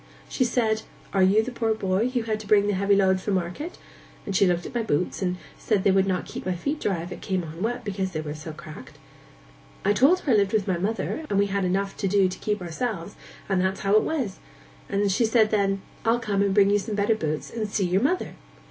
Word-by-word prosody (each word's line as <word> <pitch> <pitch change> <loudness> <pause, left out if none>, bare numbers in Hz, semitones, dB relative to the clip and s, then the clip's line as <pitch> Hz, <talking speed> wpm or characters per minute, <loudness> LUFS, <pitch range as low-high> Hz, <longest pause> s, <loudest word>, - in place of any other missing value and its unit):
She 255 - 0
said, 225 -3 +1 0.3
"Are 195 - +3
you 200 +4 +5
the 255 - -5
poor 225 -2 0
boy 195 +3 0
who 250 -2 -1
had 220 -1 -2
to 215 - -10
bring 205 -1 +5
the 205 - +1
heavy 200 +1 +3
load 190 -1 +3
from 200 +1 -1
market?" 185 - -4 0.5
And 195 - -3
she 195 - +5
looked 175 -1 0
at - - -7
my 240 - 0
boots, 180 -4 -1
and 180 -1 -1 0.2
said 205 -4 +1
they 195 - +4
would 190 0 +3
not 185 -2 -1
keep - - -7
my 185 -1 -1
feet 285 - -2
dry 180 -5 -1
if 175 - -8
it 175 - -7
came 190 -3 -1
on 165 +2 -8
wet, 240 +3 -2
because 190 -2 -2
they 155 -3 -3
were 150 -1 -5
so 155 +1 -7
cracked. 155 0 -11 0.9
I 205 - +4
told 285 - +4
her 280 - 0
I - - +6
lived 200 -1 +2
with 210 -2 +1
my 180 -3 0
mother, 220 - -2
and 200 - +1
we 200 - +4
had 200 -1 -1
enough 195 +2 -1
to 195 - -1
do 195 0 +4
to 185 0 -6
keep 210 -3 -2
ourselves, 190 +1 -4 0.3
and 190 -2 +1
that's 190 +1 -1
how 195 0 +1
it 215 - +6
was; 260 -12 -2 0.5
and 200 0 +1
she 200 - +2
said 220 -1 +3
then, 195 -2 +1 0.2
"I'll 230 +1 +3
come 205 -4 0
and 200 -1 +2
bring 200 0 +5
you 205 - +4
some 210 +1 -4
better 205 +2 +2
boots, 155 -8 -3
and 220 -2 -3
see 200 -1 0
your 180 +2 +2
mother." 360 +9 0
200 Hz, 255 wpm, -25 LUFS, 185-220 Hz, 0.9 s, I